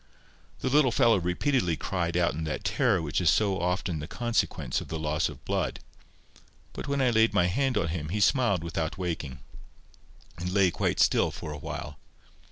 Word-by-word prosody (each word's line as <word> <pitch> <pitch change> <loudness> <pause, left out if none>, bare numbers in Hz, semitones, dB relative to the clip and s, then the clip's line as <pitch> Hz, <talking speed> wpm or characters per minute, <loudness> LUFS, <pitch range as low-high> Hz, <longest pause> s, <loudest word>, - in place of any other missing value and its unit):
The - - 0
little 140 -2 +4
fellow 115 -3 +4
repeatedly 90 - 0
cried 85 -2 -2
out 85 -1 +2
in 80 - -4
that 75 - -4
terror - - +1
which 80 +3 -1
is 85 - +4
so 95 +4 +2
often 90 -2 -1
the 75 - -6
consequence 120 +4 -1
of - - -8
the 80 - -4
loss 75 +1 0
of 70 -4 -12
blood; - - -1 0.9
but - - -6
when 140 -1 0
I 125 - +3
laid 110 0 +3
my 90 - +4
hand 125 +7 +1
on 85 -5 0
him, 80 -2 -4
he 105 +5 -2
smiled 100 -3 +2
without 85 -1 -3
waking, 80 -8 -4 1.0
and 90 +1 -3
lay 95 -2 +3
quite - - -1
still - - +4
again - - -5
for 75 - -6
a 75 - -6
while. 75 -1 -6
90 Hz, 190 wpm, -28 LUFS, 80-110 Hz, 1.0 s, little